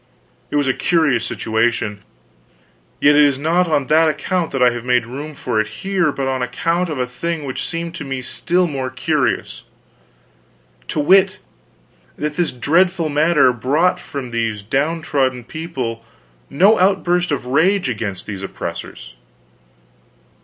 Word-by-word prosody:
It - - -4
was 145 -1 +2
a 130 - +3
curious 155 -9 +1
situation; 110 -2 -1 1.0
yet 145 0 +5
it 150 - +6
is 140 -2 +3
not 170 +5 +1
on 150 -4 +1
that 155 +3 +4
account 175 +2 -1
that 135 -2 0
I 125 - +5
have 120 -1 -5
made 125 -1 +2
room 145 +5 -7
for 120 -5 0
it 110 - -4
here, 180 - -1
but 135 -1 -3
on 130 -1 -1
account 170 +7 -1
of 155 - -3
a 125 - 0
thing 155 +5 -4
which 130 - -4
seemed 170 0 -4
to 170 - -6
me 135 -2 -4
still 180 +7 +1
more 135 -5 -3
curious. 130 - -1 1.2
To - - -2
wit, 190 +5 +4 0.8
that 150 0 -3
this 175 0 0
dreadful 165 +6 +1
matter 150 -3 +3
brought 145 +10 +1
from 130 -4 -7
these 115 -3 -2
downtrodden 140 - 0
people 130 -6 -5 0.5
no 200 +9 +4
outburst 180 -2 +2
of 140 -3 -2
rage 180 +8 +2
against 105 -6 -4
these 100 -2 -6
oppressors. 80 -9 -7
145 Hz, 150 wpm, -19 LUFS, 125-170 Hz, 1.2 s, it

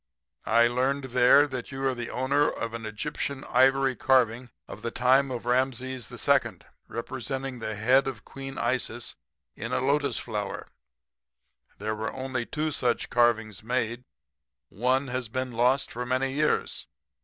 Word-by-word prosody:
"'I 115 +1 +5
learned 130 +3 0
there 125 +3 +6
that 130 -1 -6
you 135 0 -4
are 130 - +1
the 120 -1 -5
owner 140 +3 +2
of 115 0 -4
an 115 -1 -5
Egyptian 135 +5 -4
ivory 135 +1 +4
carving 125 -1 +2 0.2
of - - -9
the 120 - -2
time 130 +3 +3
of 120 -2 -5
Rameses 130 -1 -1
II., - - +1 0.3
representing 130 +2 -4
the 110 -1 -3
head 125 +6 +3
of 125 -6 -5
Queen 135 0 -8
Isis 120 -1 -1 0.4
in - - -5
a - - +1
lotus 140 -1 +1
flower. 105 -4 -4 1.1
There 110 +2 -2
were 110 +1 -3
only 130 -2 -3
two 155 0 -1
of 150 - -3
such 120 -2 0
carvings 115 -4 +2
made. 120 +1 -2 0.7
One 130 +5 0
has 125 -2 -3
been 130 +2 -3
lost 125 +4 +2
for 125 - -4
many 130 +2 0
years. 150 +2 0
125 Hz, 155 wpm, -27 LUFS, 115-135 Hz, 1.1 s, there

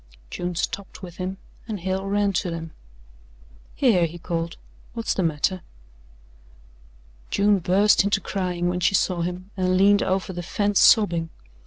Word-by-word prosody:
June 175 0 -4
stopped 195 +3 -4
with 175 -2 -9
him 185 +1 -4 0.3
and 210 -5 -5
Hale 190 +2 -2
ran 200 0 +1
to 180 0 -1
them. 165 -1 -6 1.0
"Here," 195 -11 +3
he 170 +2 -10
called, 170 -1 -4 0.4
"what's 230 -1 -1
the - - -1
matter?" 165 +2 0 1.7
June 205 0 +3
burst 195 +4 +4
into 200 0 +1
crying 180 -2 -2
when 180 0 -1
she 180 +2 +2
saw 180 -2 +1
him 180 +3 -5
and 185 -1 +1
leaned 200 +2 +5
over 190 0 -1
the 175 - -5
fence 205 +3 0
sobbing. 170 -7 +4
185 Hz, 150 wpm, -24 LUFS, 175-200 Hz, 1.7 s, leaned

